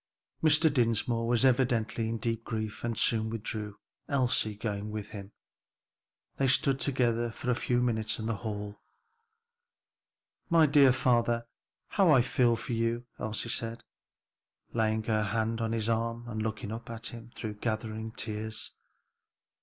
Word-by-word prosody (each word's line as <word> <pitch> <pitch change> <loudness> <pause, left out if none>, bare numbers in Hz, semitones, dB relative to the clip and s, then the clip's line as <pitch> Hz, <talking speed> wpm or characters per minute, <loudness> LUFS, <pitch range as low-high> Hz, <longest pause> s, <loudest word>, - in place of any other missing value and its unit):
Mr. 155 0 +5
Dinsmore 115 -2 +1
was 120 +2 +3
evidently 120 -3 +2
in 115 - -2
deep 115 0 -2
grief 110 -2 -4
and 115 -1 -2
soon 110 -1 +2
withdrew, 105 -2 -4 0.3
Elsie 125 -6 +1
going 105 -1 -3
with 105 -1 -5
him. 100 -1 -8 1.1
They 135 - +2
stood 135 0 +3
together 120 -3 +1
for 125 +2 -3
a - - +2
few 120 0 +1
minute 110 -3 +1
in 110 - -5
the 115 -2 -1
hall. 105 -1 -5 1.7
"My 165 -2 +6
dear 140 -2 +6
father, 120 -2 +2 0.4
how 195 -4 +3
I 135 -5 +6
feel 120 -2 +3
for 115 - -5
you!" 115 +1 0
Elsie 110 +2 -3
said, 115 0 -2 0.9
laying 110 -1 +1
her 110 -1 +1
hand 110 +2 -1
on 115 0 -1
his 115 -1 -1
arm 115 +1 -1
and 110 -2 -3
looking 110 -1 -3
up 115 +1 -7
at 115 0 -7
him 115 0 -8
through 105 -2 -6
gathering 110 0 -3
tears. 110 -1 -2
115 Hz, 145 wpm, -30 LUFS, 110-120 Hz, 1.7 s, My